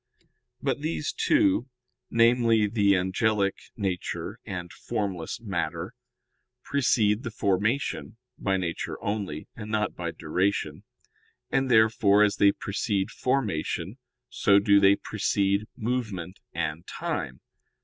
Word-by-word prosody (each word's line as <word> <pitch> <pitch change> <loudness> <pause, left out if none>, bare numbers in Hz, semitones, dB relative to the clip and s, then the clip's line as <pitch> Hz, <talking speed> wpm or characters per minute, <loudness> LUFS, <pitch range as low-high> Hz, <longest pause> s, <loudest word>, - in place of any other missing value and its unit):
But - - 0
these 80 -2 -2
two, 100 +7 +2 0.4
namely, 115 -1 +4
the 100 -2 +3
angelic 100 +2 +1 0.2
nature 95 -5 -3
and 90 -2 -5
formless 95 -6 -3
matter, - - -3 0.7
precede 115 -6 +2
the 115 - -4
formation, 110 +5 -1 0.2
by 95 -1 0
nature 85 -3 -3
only, 100 -7 -3
and 105 -2 -8
not 105 -1 0
by 85 -1 -3
duration; 90 +5 -1 0.7
and 135 -1 +1
therefore, 110 -3 +5
as 105 -1 +2
they 100 0 +6
precede 100 -1 -2
formation, 105 - -1 0.3
so 100 -1 +3
do 100 0 +5
they 100 0 +6
precede 100 0 0
movement 105 -7 -3
and 75 +3 -3
time. 65 0 -4
100 Hz, 110 wpm, -27 LUFS, 95-110 Hz, 0.7 s, they